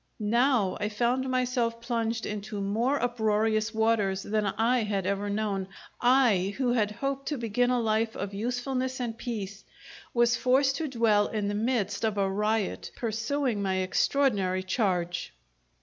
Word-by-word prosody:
Now 240 -6 +3
I 205 - -1
found 245 +4 0
myself 250 -2 0
plunged 230 -1 -2
into 210 0 -5
more 225 +8 0
uproarious 220 -2 +1
waters 220 -4 +1
than 215 0 0
I 230 +5 +2
had 200 -3 -1
ever 200 +1 -1
known 200 -2 -1 0.3
I, 235 -7 +3
who 250 -2 +1
had 215 -4 +2
hoped 275 +5 -4
to 295 - -1
begin 240 +1 +1
a 250 -1 +2
life 220 0 0
of 200 0 -4
usefulness 255 +4 -2
and 235 -3 -3
peace, 210 -5 -5 0.5
was 240 0 +3
forced 270 +1 +2
to 320 - -2
dwell 225 -5 +2
in 210 -2 -2
the - - -2
midst 210 -2 -1
of 215 -2 0
a 195 -1 +2
riot, 210 +1 -1
pursuing 230 +1 -1
my 190 -1 0
extraordinary 190 -1 +1
charge. 180 -4 -1
225 Hz, 150 wpm, -28 LUFS, 205-245 Hz, 0.5 s, Now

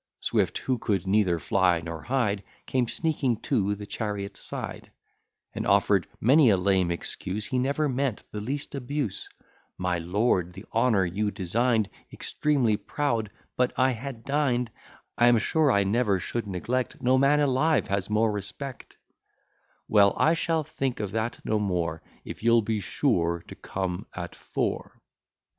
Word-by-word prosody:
Swift, - - 0
who 130 -2 -1
could 100 -4 -1
neither 95 -3 +3
fly 90 +2 +2
nor 85 -1 -6
hide, 120 -6 0 0.2
Came 125 -2 0
sneaking 140 -5 0
to 100 -1 +1
the 105 0 -8
chariot 100 -1 -4
side, - - -6 0.6
And - - -3
offer'd - - +3
many 135 +3 +6
a 100 - +4
lame 95 -1 +2
excuse: 95 +4 -3
He 130 - -1
never 140 +4 +1
meant 135 -3 -1
the 105 - -4
least 135 +6 -4
abuse 140 -4 -3 0.5
"My 90 -1 0
lord 90 0 +1
the 95 +3 -10
honour 115 -5 +3
you 100 +5 -1
design'd 110 +3 +1 0.2
Extremely 135 -8 +1
proud 115 -1 -1 0.3
but 125 0 0
I 130 0 +4
had 120 -1 -6
dined 130 -5 +1 0.5
I 120 - +6
am 120 -1 +6
sure 150 +6 +2
I 100 -3 +3
never 105 0 +2
should 115 +4 -3
neglect 120 +7 -2
No 130 +1 +4
man 140 +2 +4
alive 145 +3 +2
has 100 0 -1
more 110 +1 +2
respect" 105 +7 -7 0.9
Well, 100 -2 +5
I 160 - +4
shall 165 -1 0
think 135 -4 -3
of 105 -3 -3
that 110 +2 -2
no 110 - +1
more, 85 -5 -1 0.2
If - - -8
you'll 115 0 +4
be 110 0 -1
sure 85 - 0
to - - -9
come 95 0 -4
at 85 -2 -5
four." - - -3
110 Hz, 155 wpm, -27 LUFS, 95-130 Hz, 0.9 s, many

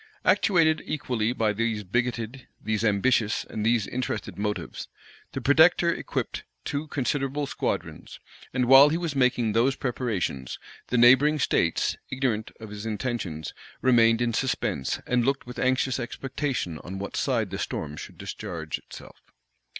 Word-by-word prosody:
Actuated 165 -5 +3
equally 125 -7 -1
by 110 -4 +1
these 110 0 -1
bigoted, 120 +4 -2
these 110 0 -2
ambitious, 110 +1 +2
and 110 - -4
these 115 -1 +2
interested 120 -4 -4
motives, 105 -5 -4 0.5
the 135 - -3
protector 165 +5 +5
equipped - - -4 0.2
two 145 +2 -3
considerable 140 0 -1
squadrons; - - -4 0.3
and 125 -1 +1
while 135 +3 +8
he 160 - 0
was 170 -4 -3
making 125 -4 +2
those 125 +5 +3
preparations, 110 - -2 0.3
the 125 - 0
neighboring 130 +6 +6
states, 85 - +1
ignorant 125 -5 -1
of 110 -2 -9
his 105 0 -7
intentions, 105 - -3 0.3
remained 115 -2 +5
in 120 -1 0
suspense, 110 - -1
and 125 -1 +1
looked 135 +2 0
with 125 0 -8
anxious 130 0 +1
expectation 130 - -3
on 95 +2 -7
what 100 +1 -5
side - - 0
the - - -4
storm 75 -1 -4
should - - -9
discharge - - -5
itself. - - -13
120 Hz, 140 wpm, -26 LUFS, 105-135 Hz, 0.5 s, while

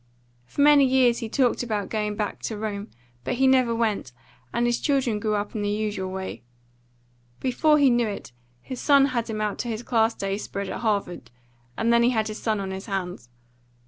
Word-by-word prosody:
For 285 - -2
many 290 -1 +7
years 255 -2 +3
he 225 - -5
talked 250 0 +1
about 215 -4 -2
going 210 -1 -1
back 210 -1 -3
to 220 - -3
Rome, 210 0 -4 0.3
but - - -2
he 265 +2 +2
never 255 -3 +4
went, 215 - -1 0.4
and 240 - 0
his 240 0 +1
children 260 -7 +1
grew 215 0 0
up 205 0 -3
in 215 - -3
the 205 - -1
usual 205 -3 -2
way. 190 0 -5 1.0
Before 300 +4 +3
he 280 -3 +5
knew 240 -1 +2
it 200 -9 -6 0.3
his 255 -2 -6
son 280 -2 +5
had 235 -1 -1
him 215 -1 -3
out 210 -1 -2
to - - -3
his 225 0 -4
class 225 -2 +2
day 195 +1 -2
spread 200 -2 -5
at - - -4
Harvard, 200 - -2 0.5
and 230 +1 +2
then 235 - +5
he 235 - +4
had 220 -3 0
his 215 - -7
son 215 -2 0
on 195 -1 -4
his 190 +2 -6
hands. 180 - -4
220 Hz, 210 wpm, -25 LUFS, 205-245 Hz, 1.0 s, many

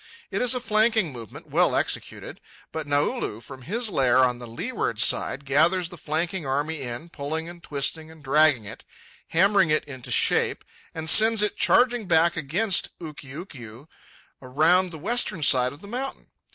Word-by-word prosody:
It - - -1
is 250 +1 +3
a - - -1
flanking 220 - +2
movement, 115 -4 -10
well - - +2
executed. - - -3 0.3
But 160 -2 -5
Naulu, 145 -6 -1
from 130 +2 -11
his 215 - -2
lair 130 -6 +2
on 125 -2 +3
the 120 - -9
leeward 120 - -3
side, 130 +3 +1
gathers 165 +6 +2
the 180 - -10
flanking 165 +4 -3
army 145 +3 -2
in, 125 +6 -6
pulling 160 +1 -5
and 175 0 -11
twisting 155 +2 -2
and 160 -2 -16
dragging 145 -4 +3
it, 100 - -10 0.4
hammering 195 0 +3
it 155 - +2
into 130 -4 -10
shape, - - +1 0.3
and 160 0 -5
sends 220 +5 +5
it 210 - -1
charging 245 -4 +2
back 170 0 +3
against 185 +7 -1
Ukiukiu 140 - -10 0.5
around 160 +8 +2
the 165 - -9
western 205 -1 -1
side 125 -3 +3
of 145 +4 -13
the 200 - -12
mountain. 255 +5 -6
160 Hz, 165 wpm, -24 LUFS, 135-190 Hz, 0.5 s, sends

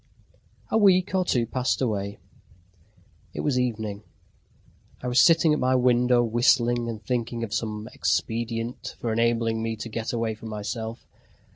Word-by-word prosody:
A 220 - +3
week 190 -2 +4
or 190 -1 +2
two 125 -9 +1
passed 125 +2 -1
away. 100 -5 -2 1.2
It - - -2
was 135 -4 +1
evening. 110 -5 -2 1.0
I - - -2
was 125 +1 +4
sitting 165 -2 +5
at 150 - 0
my 130 0 +2
window 125 -1 +3
whistling 120 0 +2
and 110 -2 -7
thinking 120 0 -2
of 105 -3 -5
some 110 -1 -3
expedient 115 +1 -2
for 115 -2 -2
enabling 115 0 +1
me 115 0 -2
to 115 +2 -7
get 110 0 -3
away 115 -2 -1
from 110 +1 -9
myself. 110 +2 -5
115 Hz, 150 wpm, -25 LUFS, 110-125 Hz, 1.2 s, sitting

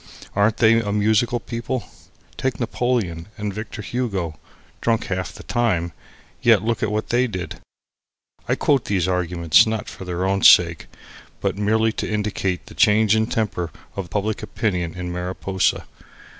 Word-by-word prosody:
Aren't 105 +2 +3
they 115 0 +5
a 105 -2 -3
musical 110 +3 +2
people? 120 0 -4 0.5
Take 130 -4 -2
Napoleon, 115 -8 -1
and 105 -2 -3
Victor 110 +1 -6
Hugo; 95 - -3 0.4
drunk 115 -1 +1
half 95 -1 -3
the - - -12
time, 115 -8 +1
and 85 - -6 0.5
yet 115 -5 +5
look 115 +1 -1
what 105 0 -1
they 125 +2 +2
did. 95 -6 -6 0.9
I - - +3
quote 140 -4 +2
these 95 -3 0
arguments 90 -2 +3
not 110 -1 -2
for - - -8
their 90 0 -2
own 95 0 +1
sake, 85 -2 +6 0.5
but - - -1
merely 110 +2 +2
to - - -4
indicate 105 -3 -1
the - - -12
changing 110 +1 +4
temper 100 -7 -1 0.3
of 95 -3 -5
public 105 +4 -2
opinion 90 -6 -2
in 90 -1 -4
Mariposa. 90 +2 -1
105 Hz, 150 wpm, -22 LUFS, 90-110 Hz, 0.9 s, sake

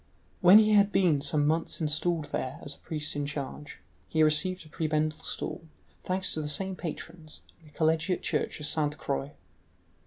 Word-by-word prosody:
When 185 +3 +8
he 215 0 +5
had 205 -1 +5
been 170 -9 +3
some 145 0 +1
months 160 +2 0
installed 155 0 -1
there 130 +2 -3
as 145 - -5
a - - -16
priest 150 -2 -3
in 145 -1 -2
charge, 145 0 -6 0.3
he 160 -1 +2
received 170 +4 +2
a - - -14
prebendal 155 -1 -1
stall, 165 - -4 0.4
thanks 185 +1 0
to 155 - -2
the 150 - -3
same 190 +5 0
patrons, 165 -1 -7 0.2
in 160 - -20
the - - -17
collegiate 160 +4 +1
church - - -1
of 150 - -3
Sainte 150 0 0
Croix. 140 +1 -3
155 Hz, 180 wpm, -28 LUFS, 150-175 Hz, 0.4 s, When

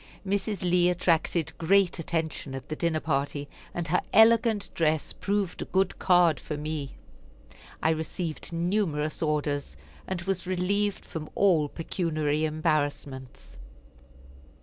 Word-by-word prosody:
Mrs. 200 0 -1
Lee 180 0 +4
attracted 170 -2 +1
great 185 +1 +3
attention 160 -4 -3
at 135 - -8
the 155 - -2
dinner 165 -1 0
party, 145 -1 -1 0.2
and 170 -2 -4
her 180 - +3
elegant 225 -1 +5
dress 155 -2 0
proved 195 -1 -2
a - - -2
good 190 +1 0
card 175 -4 +4
for 150 - -5
me. 150 -2 -4 0.9
I 160 - +4
received 160 +1 -4
numerous 170 -3 -1
orders, 145 - -1 0.3
and 175 -2 -3
was 190 -1 -2
relieved 195 +3 0
from 155 -2 -6
all 165 -7 +3
pecuniary 155 -3 -1
embarrassments. 145 -4 -2
165 Hz, 125 wpm, -27 LUFS, 155-185 Hz, 0.9 s, elegant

